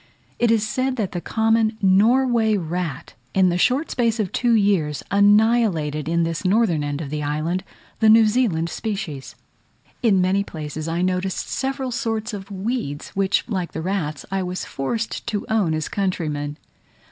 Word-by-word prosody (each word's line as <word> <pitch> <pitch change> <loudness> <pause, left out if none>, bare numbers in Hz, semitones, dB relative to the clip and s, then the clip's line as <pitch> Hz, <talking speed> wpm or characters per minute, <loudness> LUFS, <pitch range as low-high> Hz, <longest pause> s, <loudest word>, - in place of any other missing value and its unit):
It 240 - +3
is 220 -1 +2
said 255 +4 -1
that 210 -7 -2
the 175 - -4
common 225 +1 +1
Norway 220 +3 +3
rat, 170 -4 -4 0.2
in 190 -1 +5
the 175 - 0
short 260 - +2
space 230 -2 +1
of 200 -4 -1
two 240 -2 +2
years, 185 - +1
annihilated 200 -7 +3
in 170 0 +2
this 165 +1 -2
northern 190 -5 +2
end 145 +1 -3
of 145 -3 -6
the 150 0 -2
island, 155 +5 -1 0.4
the 220 - +5
New 225 +1 +7
Zealand 210 -8 +1
species. 195 - -5 0.7
In 215 -6 +3
many 190 +2 +2
places 155 -3 -6
I 170 +2 -1
noticed 185 +1 -1
several 265 -1 -2
sorts 225 -1 -2
of 195 -1 -7
weeds, 195 - -3
which, 195 0 0
like 185 -7 -3
the 160 - -4
rats, 165 -6 -2
I 195 0 0
was 180 0 -4
forced 220 - -3
to 210 -4 -2
own 195 -8 +2
as 155 -1 -2
countrymen. 150 -7 -2
195 Hz, 165 wpm, -22 LUFS, 165-225 Hz, 0.7 s, New